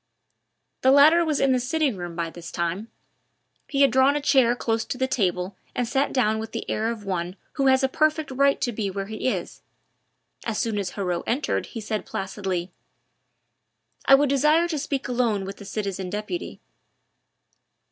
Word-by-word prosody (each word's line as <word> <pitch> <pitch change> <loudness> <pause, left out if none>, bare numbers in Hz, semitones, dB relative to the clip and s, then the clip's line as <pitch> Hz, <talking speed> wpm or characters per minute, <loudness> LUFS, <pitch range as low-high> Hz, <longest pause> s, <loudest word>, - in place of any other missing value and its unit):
The 260 - +4
latter 300 +5 +7
was 310 -3 0
in 275 -1 +3
the 255 - +3
sitting 280 0 0
room 175 -2 -6
by 165 -1 -3
this 170 -1 -9
time; 170 +5 -2 0.8
he 280 -1 0
had 275 -3 +6
drawn 265 +3 +4
a - - +1
chair 265 -4 +3
close 225 -2 -1
to - - -4
the 260 - +1
table 185 -6 -1 0.2
and 245 - 0
sat 270 +4 +1
down 220 -4 +1
with 220 0 -6
the - - -4
air 220 +1 -1
of 225 -3 -5
one 180 -1 -3 0.2
who 275 -2 +1
has 265 0 +4
a - - +4
perfect 310 +1 +1
right 275 +1 +3
to 240 - 0
be 210 -3 -2
where 195 +1 -4
he 215 +4 -4
is; - - -4 0.8
as 225 -2 -2
soon 225 -3 -1
as 195 -3 -3
Heriot 180 -4 -2
entered 260 +6 -1
he 230 - -7
said 215 0 -3
placidly: 190 -2 -3 1.3
"I 270 - +8
would 285 0 +2
desire 300 +5 +3
to 310 -3 -1
speak 275 -1 -3
alone 235 -5 0
with 195 +1 -7
the 200 - -11
citizen 195 -3 -4
deputy." 210 - -5
230 Hz, 185 wpm, -24 LUFS, 195-275 Hz, 1.3 s, I